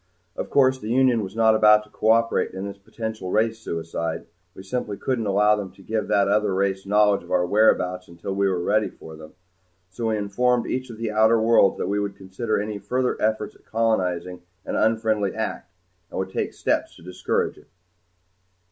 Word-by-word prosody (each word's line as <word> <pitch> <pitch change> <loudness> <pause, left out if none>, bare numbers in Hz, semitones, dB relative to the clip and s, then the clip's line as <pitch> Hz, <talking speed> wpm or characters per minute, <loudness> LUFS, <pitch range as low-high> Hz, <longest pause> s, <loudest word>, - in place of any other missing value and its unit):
Of - - -5
course 130 -2 +3
the 110 - -6
Union 125 -1 +3
was 100 0 -7
not 110 -1 +4
about 105 -1 +5
to 105 - -22
cooperate 115 -2 +1
in 95 +1 -4
this 100 0 -7
potential 110 -1 -6
race 110 +3 +1
suicide. 85 -4 -4 0.3
We 95 - -10
simply 105 0 -4
couldn't 120 -3 -2
allow 105 +2 +4
them 100 -3 -5
to 95 - -17
give 110 +1 -2
that 100 -1 +3
other 105 -1 +1
race 95 0 -1
knowledge 105 0 +3
of - - -16
our 90 -1 +2
whereabouts 90 -2 +2
until 85 +3 -6
we 100 0 +1
were 90 -2 -1
ready 110 +2 +1
for 80 0 -12
them. 80 0 -13 0.6
So 115 +5 -3
we 110 -1 0
informed 120 +4 +1
each 130 0 -3
of 115 - -9
the 115 -1 -3
outer 110 +1 +4
worlds 110 -3 +4
that - - -2
we 100 +1 0
would 100 -1 -3
consider 100 +4 -3
any 105 0 -4
further 125 +4 -1
efforts 110 0 0
at - - -25
colonizing 90 -6 -1 0.2
an - - -3
unfriendly 110 -2 +1
act, - - -4 0.4
and - - -7
would 95 0 -3
take - - -2
steps - - -1
to - - -16
discourage 90 +1 -2
it. - - -21
105 Hz, 195 wpm, -23 LUFS, 95-110 Hz, 0.6 s, about